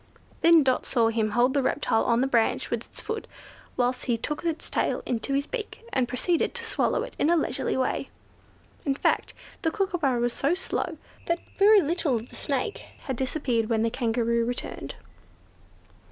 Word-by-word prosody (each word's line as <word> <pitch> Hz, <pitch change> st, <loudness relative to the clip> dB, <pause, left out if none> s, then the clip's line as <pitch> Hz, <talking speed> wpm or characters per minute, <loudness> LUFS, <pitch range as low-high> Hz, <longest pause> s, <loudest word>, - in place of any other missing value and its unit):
Then 335 Hz, -2 st, +7 dB
Dot 260 Hz, -1 st, +1 dB
saw 230 Hz, -3 st, +3 dB
him 220 Hz, -1 st, 0 dB
hold 240 Hz, +4 st, +3 dB
the 280 Hz, -, +2 dB
reptile 225 Hz, -3 st, +1 dB
on 235 Hz, +1 st, +3 dB
the -, -, +3 dB
branch 235 Hz, -4 st, +1 dB
with -, -, -3 dB
his -, -, -8 dB
foot, 445 Hz, -1 st, -4 dB, 0.5 s
whilst 250 Hz, 0 st, 0 dB
he 240 Hz, -3 st, +1 dB
took 300 Hz, +8 st, -4 dB
its 330 Hz, -2 st, -2 dB
tail -, -, 0 dB
into 250 Hz, +3 st, -1 dB
his 280 Hz, +1 st, +1 dB
beak, 455 Hz, +3 st, -6 dB
and 255 Hz, -2 st, +2 dB
proceeded 335 Hz, -, 0 dB
to 470 Hz, -, -3 dB
swallow 465 Hz, +2 st, +1 dB
it -, -, -8 dB
in 295 Hz, -, +3 dB
a 345 Hz, -, +5 dB
leisurely 315 Hz, -, 0 dB
way. 260 Hz, -, -1 dB, 0.7 s
In 275 Hz, -2 st, 0 dB
fact -, -, 0 dB, 0.3 s
the 325 Hz, -, +2 dB
Kookooburra 340 Hz, -, 0 dB
was 240 Hz, 0 st, +1 dB
so 285 Hz, +6 st, +1 dB
slow 375 Hz, -, -2 dB, 0.3 s
that 340 Hz, -, +2 dB, 0.2 s
very 410 Hz, +1 st, +7 dB
little 315 Hz, -4 st, 0 dB
of 230 Hz, +2 st, -4 dB
the -, -, -12 dB
snake 405 Hz, +10 st, -1 dB, 0.2 s
had 265 Hz, -, -3 dB
disappeared 250 Hz, -3 st, -1 dB
when 225 Hz, -1 st, +2 dB
the 230 Hz, -, +1 dB
Kangaroo 235 Hz, -1 st, +1 dB
returned. 245 Hz, +2 st, -4 dB
265 Hz, 180 wpm, -26 LUFS, 240-335 Hz, 0.7 s, Then